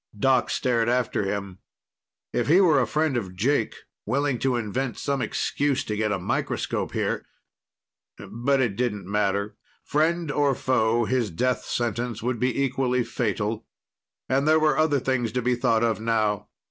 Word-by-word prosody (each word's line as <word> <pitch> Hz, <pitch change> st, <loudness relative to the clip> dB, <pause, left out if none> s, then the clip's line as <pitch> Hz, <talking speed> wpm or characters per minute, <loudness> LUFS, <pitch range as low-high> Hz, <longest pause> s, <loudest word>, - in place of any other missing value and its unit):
Doc 130 Hz, +3 st, +2 dB
stared 120 Hz, -3 st, +1 dB
after 125 Hz, -4 st, 0 dB
him. 100 Hz, -2 st, -4 dB, 0.7 s
If -, -, 0 dB
he 165 Hz, +6 st, +6 dB
were 160 Hz, -8 st, +5 dB
a 120 Hz, -, 0 dB
friend 150 Hz, +5 st, 0 dB
of 95 Hz, -6 st, -3 dB
Jake, 115 Hz, +4 st, +1 dB, 0.3 s
willing 135 Hz, +2 st, 0 dB
to 130 Hz, -2 st, +1 dB
invent 120 Hz, +2 st, -2 dB
some 140 Hz, -2 st, -1 dB
excuse 140 Hz, +2 st, 0 dB
to 105 Hz, -, -3 dB
get 105 Hz, 0 st, 0 dB
a 100 Hz, -, +1 dB
microscope 90 Hz, -, -2 dB
here... -, -, -1 dB, 0.9 s
but 135 Hz, +4 st, -1 dB
it 120 Hz, -7 st, +1 dB
didn't 105 Hz, -5 st, -2 dB
matter. 100 Hz, +1 st, -1 dB, 0.3 s
Friend 160 Hz, +1 st, 0 dB
or 145 Hz, -2 st, +2 dB
foe, 120 Hz, -2 st, +1 dB
his 120 Hz, -2 st, 0 dB
death 125 Hz, +9 st, -1 dB
sentence 120 Hz, -1 st, -2 dB
would 125 Hz, -1 st, -1 dB
be 130 Hz, +2 st, +1 dB
equally 125 Hz, -1 st, 0 dB
fatal. 110 Hz, -1 st, -2 dB, 0.6 s
And 135 Hz, +3 st, +1 dB
there 155 Hz, 0 st, +5 dB
were 155 Hz, -2 st, +3 dB
other 155 Hz, -2 st, +2 dB
things 125 Hz, -3 st, -1 dB
to 125 Hz, -, 0 dB
be 125 Hz, +1 st, +2 dB
thought 115 Hz, -1 st, +2 dB
of 115 Hz, -2 st, +1 dB
now. 110 Hz, -2 st, 0 dB
120 Hz, 160 wpm, -25 LUFS, 110-135 Hz, 0.9 s, he